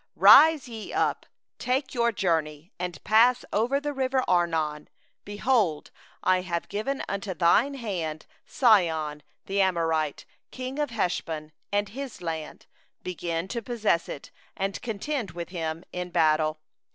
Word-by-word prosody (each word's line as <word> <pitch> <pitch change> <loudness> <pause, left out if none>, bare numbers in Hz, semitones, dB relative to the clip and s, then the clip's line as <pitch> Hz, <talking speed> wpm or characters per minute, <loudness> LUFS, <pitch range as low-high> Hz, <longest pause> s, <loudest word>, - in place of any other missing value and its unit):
— - - -40
24Rise 315 -3 +8
ye 225 -3 -7
up, - - 0 0.3
take 260 +2 -1
your 235 -2 +2
journey, 165 -4 -1
and 175 -4 -5
pass 235 +3 +4
over 240 +6 +2
the 290 0 -3
valley 265 -1 0
of 260 -1 +2
Arnon; 160 -4 0 0.4
behold, 205 - 0 0.3
I 185 0 +3
have 170 -2 -3
given 265 +7 -2
into 200 -1 -4
thy 175 +7 +4
hand 170 - -4 0.2
Sihon 160 - +2 0.2
the 195 +1 0
Amorite, 165 -5 0 0.2
king 260 +2 -6
of 295 -2 0
Heshbon, 165 -8 -2 0.2
and 205 0 0
his 265 +3 -7
land; 160 -3 -5 0.4
begin 170 -1 -3
to 235 +1 -3
possess 220 -7 0
it, 140 - -8 0.3
and 195 0 -2
contend 235 +1 -3
with 170 -1 -5
him 165 -2 -4
in 180 0 -4
battle. 155 -2 +2
185 Hz, 140 wpm, -26 LUFS, 165-235 Hz, 0.4 s, 24Rise